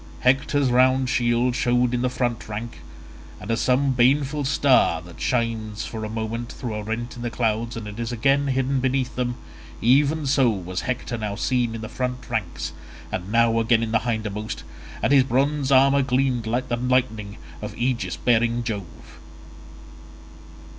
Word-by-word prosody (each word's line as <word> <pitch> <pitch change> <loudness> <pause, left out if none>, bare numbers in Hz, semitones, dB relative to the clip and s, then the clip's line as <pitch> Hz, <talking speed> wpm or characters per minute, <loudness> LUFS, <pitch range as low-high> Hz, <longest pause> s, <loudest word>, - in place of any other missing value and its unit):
Hector's 135 +1 +2
round 130 +1 +3
shield 120 +1 +1
showed 125 0 +2
in 120 - 0
the 125 - +1
front 120 -3 -2
rank, 110 +3 -6 0.6
and - - -5
as 115 - 0
some 135 +2 +2
baneful 135 +4 +2
star 135 - +3
that 85 -1 -13
shines 115 -3 -1
for 110 -1 -6
a 110 - -4
moment 115 +2 -4
through 120 -5 -5
a 105 - -3
rent 115 +3 -4
in 120 - -8
the 120 - -2
clouds 115 0 -1
and 105 0 -7
is 115 0 -3
again 135 +4 +2
hidden 135 0 0
beneath 130 0 -1
them; 125 -1 -1 0.4
even 140 +6 +3
so 135 -2 +3
was 95 -3 -3
Hector 120 -2 -3
now 105 -2 -3
seen 120 0 0
in 115 - -6
the 110 - -5
front 125 +1 -4
ranks 85 - -3 0.4
and 90 +3 -4
now 115 0 +3
again 115 0 +3
in 110 - -3
the 110 - +3
hindermost, 110 -2 -3 0.4
and 140 - +3
his 135 -2 +7
bronze 135 +2 0
armour 135 +1 +5
gleamed 130 -3 0
like 120 +3 -1
the 120 - -1
lightning 120 -5 0 0.2
of - - -6
aegis 120 0 -1
bearing 115 0 +2
Jove. 100 -7 -7
120 Hz, 165 wpm, -23 LUFS, 110-130 Hz, 0.6 s, his